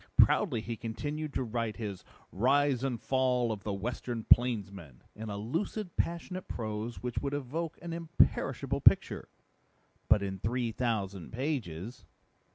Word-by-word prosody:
Proudly 135 - +5
he 115 +1 -4
continued 145 +7 -4
to - - +1
write 115 -2 -2
his 100 -5 -5 0.3
Rise 135 +4 +3
and 125 -4 -1
Fall 125 -2 +2
of 105 -2 -4
the 105 - -2
Western 115 +3 -3
Plainsman 100 - +2
in 110 +1 -6
a 100 - -3
lucid, 170 - -3
passionate 175 +2 -2
prose 110 +1 -4
which 125 -1 -1
would 140 0 -2
evoke 150 +4 -3
an 170 -1 -4
imperishable 165 0 +1
picture - - +4 0.8
but 105 -1 +6
in 95 -1 -3
three 120 +3 0
thousand 100 -7 -2
pages." 120 - -3
120 Hz, 140 wpm, -31 LUFS, 105-140 Hz, 0.8 s, but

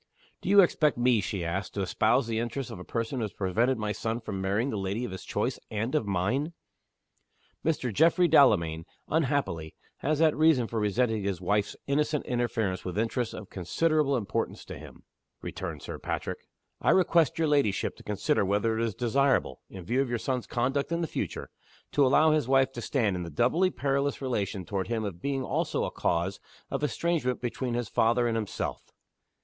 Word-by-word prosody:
"Do - - -4
you 200 0 +8
expect 155 -6 +2
me," 120 -2 +3
she 100 -4 -3
asked, 95 +4 -3
"to 100 - 0
espouse 120 +7 +2
the 115 -1 -1
interests 120 +2 -3
of - - -7
a - - -7
person 115 +6 -3
who 115 - 0
has 105 - -7
prevented 115 +7 +1
my 105 -1 -2
son 115 +2 -2
from 100 -4 -5
marrying 100 +7 0
the 110 - -2
lady 100 +5 -2
of - - -6
his 95 - -7
choice, - - -2
and 110 +4 -2
of 150 -9 +1
mine?" 120 - 0 1.1
"Mr. 140 -7 0
Geoffrey 170 - +4
Delamayn, 85 - +4 0.2
unhappily, 140 - 0 0.2
has 150 +2 0
that 160 0 +4
reason 155 -5 +4
for 115 0 -3
resenting 110 +1 +1
his 95 -3 -2
wife's 100 +3 0
innocent 150 +1 0
interference 120 -6 -1
with 90 0 -5
interests 115 +1 -1
of 105 - -9
considerable, 145 - +1
importance 105 -5 -3
to - - -7
him," - - -13 0.4
returned - - -5
Sir - - -6
Patrick. - - -3 0.4
"I - - +2
request 170 -4 +4
your 165 -1 +2
ladyship 140 -10 +1
to - - -14
consider 105 -1 0
whether 105 +3 +1
it - - +1
is 110 -4 -2
desirable 125 - +1
in 95 -3 -9
view 125 +7 +1
of 135 - -1
your 120 - 0
son's 125 +1 -2
conduct 135 +5 -1
in 170 0 0
the - - +1
future - - -4 0.4
to 145 - +3
allow 155 +4 +5
his 155 -5 +1
wife 135 0 +4
to 120 - -6
stand 110 -7 0
in 90 - -3
the 85 - -5
doubly 130 - +2
perilous 140 -3 -1
relation 105 -8 -2
toward 95 -1 -2
him 115 0 -1
of 95 -4 -5
being 135 -1 -1
also - - -1
a - - -2
cause 85 +3 -1 0.3
of - - -2
estrangement 150 -4 0
between 125 0 -3
his 120 -2 -2
father 120 +3 +2
and 115 - 0
himself." 110 -3 -3
120 Hz, 195 wpm, -28 LUFS, 100-140 Hz, 1.1 s, you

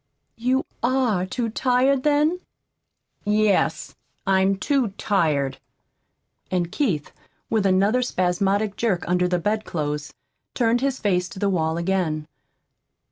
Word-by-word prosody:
"You 255 +3 +1 0.2
ARE 235 -7 +1
too 230 +4 -2
tired, 255 +3 +2
then?" 300 +4 +2 0.8
"Yes, 210 -1 +1 0.3
I'm 190 0 +3
too 250 -1 0
tired." 150 -9 0 0.9
And 175 -2 -1
Keith, 185 - -1 0.4
with 215 -3 +2
another 200 +6 +3
spasmodic 195 -1 0
jerk 205 -7 0
under 180 +1 +2
the 180 0 +1
bedclothes, 160 -7 -2 0.4
turned 240 0 +2
his 270 -1 0
face 180 -4 0
to - - -11
the 200 +1 +1
wall 160 -3 0
again. 170 -4 -1
200 Hz, 115 wpm, -23 LUFS, 180-240 Hz, 0.9 s, I'm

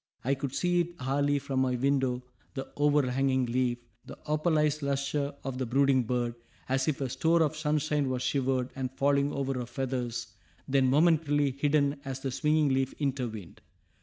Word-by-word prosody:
I 135 +3 +1
could 135 -1 -4
see 175 0 +2
it 175 0 -5
hourly 140 +2 +1
from 135 -1 -2
my 130 -1 +1
window, 130 -1 +1 0.3
the 135 -1 -5
overhanging 135 -3 +2
leaf, 120 0 0 0.3
the - - -10
opalized 150 -1 +1
lustre 140 +1 -1
of 130 -1 -4
the 130 - -1
brooding 135 0 +3
bird, 120 0 -1 0.3
as 130 0 0
if 145 -2 -1
a 135 - 0
store 165 +6 +2
of 155 0 -1
sunshine 150 -2 0
was 125 -1 -2
shivered, 130 -2 0
and 130 -1 -2
falling 140 +1 +2
over 135 -1 -2
her 120 - -4
feathers, 125 -2 -3 0.3
then 135 -1 +3
momentarily 145 -1 +3
hidden 140 +1 +1
as 135 -2 -5
the 135 - -2
swinging 150 +2 +2
leaf 135 0 0
intervened. 125 - -4
135 Hz, 165 wpm, -29 LUFS, 130-145 Hz, 0.3 s, brooding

